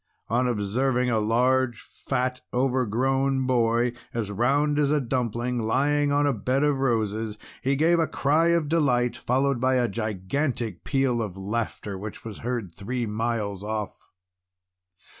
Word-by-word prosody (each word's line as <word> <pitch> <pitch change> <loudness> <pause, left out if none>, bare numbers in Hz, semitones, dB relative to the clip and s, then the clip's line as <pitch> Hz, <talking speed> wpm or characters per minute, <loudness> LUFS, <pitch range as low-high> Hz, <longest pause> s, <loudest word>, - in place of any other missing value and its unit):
On 120 +3 +2
observing 125 +3 0
a 110 - +2
large, 120 +2 +2
fat, 125 -1 -3
overgrown 130 +2 +1
boy, 120 -1 +2 0.2
as 110 -4 -2
round 140 +7 +2
as 145 -2 +3
a 150 0 +3
dumpling, 125 -1 -1
lying 145 +6 +1
on 145 0 +3
a 140 - +2
bed 130 +5 0
of 145 -2 +2
roses, 110 -4 0 0.2
he 135 +2 +1
gave 165 +4 +3
a 165 - +2
cry 155 +4 +2
of 170 -3 +2
delight, 135 -6 +2
followed 135 +1 0
by 130 0 +3
a 125 -1 +2
gigantic 110 - -2
peal 135 -3 +1
of 100 -4 -5
laughter 100 -1 -3
which 105 +2 -8
was 110 -2 -7
heard 115 -6 -3
three 115 +8 -3
miles 105 -2 -2
off. 105 -2 -5
125 Hz, 145 wpm, -26 LUFS, 110-135 Hz, 0.2 s, as